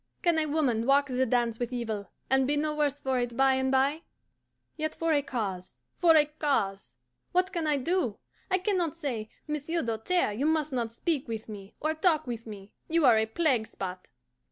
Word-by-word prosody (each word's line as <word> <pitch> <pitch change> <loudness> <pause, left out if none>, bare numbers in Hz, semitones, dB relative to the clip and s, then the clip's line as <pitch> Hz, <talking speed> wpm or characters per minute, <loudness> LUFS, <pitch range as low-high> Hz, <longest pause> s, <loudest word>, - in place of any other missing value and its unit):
Can 340 -3 +3
a 310 - 0
woman 260 -7 +1
walk 280 +1 +4
the 255 0 +1
dance 235 -1 +1
with 240 0 -2
evil, 220 -5 -3 0.2
and 265 0 +3
be 295 +1 +1
no 305 +1 0
worse 290 -2 0
for 265 -2 0
it 240 -1 -3
by 270 0 +5
and 265 0 +1
bye? 275 +4 +2 0.7
Yet 310 -1 -3
for 330 -1 +1
a 290 - +3
cause, 205 -10 -4 0.2
for 335 -2 +6
a 300 -1 +6
cause! 200 - -2 0.4
What 370 +2 +2
can 335 -3 -1
I 295 -1 +2
do? 275 - 0 0.3
I 375 - +3
can 385 +1 0
not 330 -2 -2
say, 240 -9 -3 0.2
"Monsieur 300 +3 -2
Doltaire, 230 +7 0
you 265 +8 0
must 310 -2 +1
not 235 -3 -1
speak 285 +3 -2
with 225 -1 -5
me, 200 -2 -10
or 310 +1 0
talk 315 -1 +2
with 235 -2 -5
me; 200 -2 -10 0.2
you 330 -2 +3
are 240 -3 +7
a 220 - +1
plague 250 -3 +1
spot." 185 -1 -6
270 Hz, 205 wpm, -29 LUFS, 230-310 Hz, 0.7 s, are